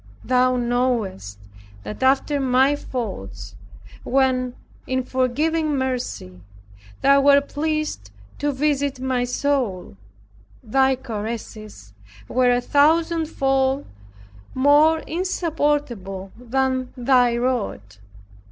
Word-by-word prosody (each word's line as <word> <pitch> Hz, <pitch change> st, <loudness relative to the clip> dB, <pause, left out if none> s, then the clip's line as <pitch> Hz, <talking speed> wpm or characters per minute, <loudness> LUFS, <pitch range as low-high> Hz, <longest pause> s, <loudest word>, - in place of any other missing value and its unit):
Thou 255 Hz, 0 st, +2 dB
knowest 235 Hz, -, -1 dB, 0.5 s
that 105 Hz, +1 st, -7 dB
after 275 Hz, +2 st, +2 dB
my 265 Hz, +2 st, +3 dB
faults, 100 Hz, -, -6 dB, 0.5 s
when, 255 Hz, -1 st, +1 dB, 0.3 s
in 260 Hz, 0 st, -1 dB
forgiving 295 Hz, +5 st, 0 dB
mercy, 250 Hz, -, -4 dB, 0.6 s
Thou 275 Hz, 0 st, +5 dB
wert 280 Hz, 0 st, +4 dB
pleased 305 Hz, -, -2 dB, 0.3 s
to 290 Hz, 0 st, 0 dB
visit 280 Hz, -1 st, -1 dB
my 255 Hz, -1 st, 0 dB
soul, 245 Hz, -, -2 dB, 0.7 s
Thy 265 Hz, +3 st, +2 dB
caresses 215 Hz, -, -7 dB, 0.3 s
were 250 Hz, -, +2 dB
a 245 Hz, 0 st, +2 dB
thousand 325 Hz, +4 st, +2 dB
fold 270 Hz, -1 st, 0 dB, 0.7 s
more 295 Hz, +4 st, +4 dB
insupportable 295 Hz, -, -2 dB
than 260 Hz, +1 st, -1 dB
Thy 245 Hz, -1 st, +3 dB
rod. 230 Hz, -, -2 dB
260 Hz, 90 wpm, -22 LUFS, 235-285 Hz, 0.7 s, Thou